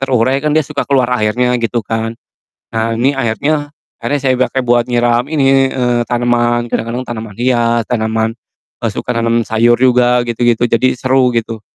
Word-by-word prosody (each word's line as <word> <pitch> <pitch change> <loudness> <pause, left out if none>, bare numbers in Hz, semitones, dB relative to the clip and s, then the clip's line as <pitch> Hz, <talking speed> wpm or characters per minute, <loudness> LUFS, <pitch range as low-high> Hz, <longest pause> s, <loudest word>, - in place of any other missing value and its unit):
terurai 130 0 +1
kan 150 +1 -1
dia 155 - +3
suka 145 0 -4
keluar 130 -3 +1
airnya, 125 +3 +1
gitu 115 0 -1
kan, 115 +1 -3 0.6
nah 115 0 -1
ini 130 +4 +2
airnya 145 +5 -1 0.3
airnya 145 0 -1
saya 130 -2 +2
pake 130 -1 -2
buat 120 0 +2
nyiram 120 +1 +1
ini, 135 -3 +3
eee, 125 -2 0
tanaman, 120 0 +1
kadang-kadang 120 +3 -2
tanaman 110 -3 -7
hias, 120 -1 +1
tanaman, 110 -1 -1 0.5
e - - -2
suka 125 - -4
nanem 115 0 +1
sayur 115 +2 +3
juga, 125 -1 +3
gitu-gitu, 120 0 +1
jadi 120 +2 +1
seru, 130 0 +2
gitu. 115 -1 -3
120 Hz, 165 wpm, -14 LUFS, 115-130 Hz, 0.6 s, dia